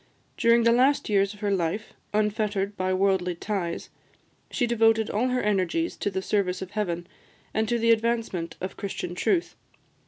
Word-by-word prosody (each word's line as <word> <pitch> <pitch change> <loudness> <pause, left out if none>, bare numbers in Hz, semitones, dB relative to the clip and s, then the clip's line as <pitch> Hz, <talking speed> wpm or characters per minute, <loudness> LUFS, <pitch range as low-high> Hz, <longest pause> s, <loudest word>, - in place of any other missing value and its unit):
During 235 0 +4
the 235 - +5
last 260 +3 +3
years 200 0 +2
of 205 - -17
her 205 -1 0
life, 190 +2 -1 0.2
unfettered 210 -1 0
by 185 -1 -1
worldly 185 -2 +1
ties, 175 -2 -3 0.6
she 245 - 0
devoted 225 -2 +3
all 230 +5 +1
her 250 0 0
energies 210 - 0
to - - -1
the 190 -1 -3
service 190 -3 0
of 190 0 -7
Heaven, 175 -5 -2 0.5
and 220 0 0
to 240 - +2
the 230 0 +3
advancement 225 -7 0
of 185 - -5
Christian 190 -3 -4
truth. 340 - 0
205 Hz, 165 wpm, -26 LUFS, 190-230 Hz, 0.6 s, the